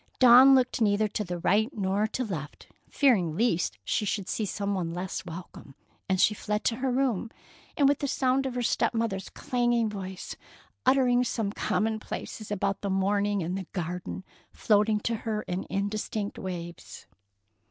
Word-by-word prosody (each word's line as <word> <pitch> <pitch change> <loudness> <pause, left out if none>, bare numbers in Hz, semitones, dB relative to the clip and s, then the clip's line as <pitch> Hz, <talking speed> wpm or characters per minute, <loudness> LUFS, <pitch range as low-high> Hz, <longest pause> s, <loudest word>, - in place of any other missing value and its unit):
Dawn 255 +2 +8
looked 255 -2 +1
neither 210 0 +3
to 190 -4 -3
right 200 +6 +2
nor 200 +2 +1
to 250 +3 -3
left, 160 - -6 0.2
fearing 185 - +2
lest 210 -7 +1
she - - 0
should 200 -1 -2
see 215 - -2
some 200 +1 -2
one 170 -3 -2
less 185 +1 -4
welcome, 165 -5 -10 0.3
and 190 -1 +1
so - - +5
she 215 - +4
fled 210 0 -3
to 230 - +1
her 260 0 -1
room, 245 -4 0 0.5
with 285 -1 +4
the 285 - -1
sound 265 0 +1
of 255 - -5
her 245 - -1
step 235 - +1
mother's 210 -4 -2
clanging 240 -2 0
voice, 190 -2 -6 0.5
uttering 255 -2 +4
some 225 -4 -2
commonplaces 215 +1 -3
about 200 -1 -1
the 200 - -2
morning 200 +1 +1
and 175 +3 -3
the 190 -3 -5
garden, 180 +1 -4 0.3
floating 210 0 +2
to 230 +1 -1
her 215 -1 -3
in 180 +1 -4
indistinct 205 +1 -3
waves. 175 -2 -7
210 Hz, 165 wpm, -28 LUFS, 190-235 Hz, 0.5 s, Dawn